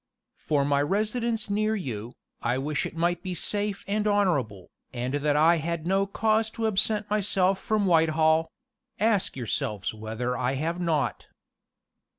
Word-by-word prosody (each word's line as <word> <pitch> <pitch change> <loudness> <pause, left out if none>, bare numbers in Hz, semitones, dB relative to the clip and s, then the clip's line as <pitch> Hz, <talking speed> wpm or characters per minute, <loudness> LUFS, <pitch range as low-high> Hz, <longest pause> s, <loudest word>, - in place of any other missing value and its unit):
"For 145 -2 +1
my 140 0 +2
residence 215 +7 -1
near 215 +2 0
you, 120 - -5 0.3
I 120 +2 0
wish 145 +2 -1
it - - -12
might 175 +1 +1
be 185 -2 -4
safe 205 +3 -2
and 210 +1 0
honorable, 145 - 0 0.2
and 125 +1 -3
that 145 0 +1
I 165 +3 +5
had 165 0 -3
no 195 +2 +2
cause 220 +2 +1
to 225 - -1
absent 210 0 +1
myself 195 -2 +2
from 215 -2 0
Whitehall: 160 -2 +3 0.5
ask 210 -8 +1
yourselves 105 -4 -2
whether 110 +3 -3
I 125 +1 0
have 165 +6 -2
not. 160 -5 -1
170 Hz, 150 wpm, -27 LUFS, 140-205 Hz, 0.5 s, I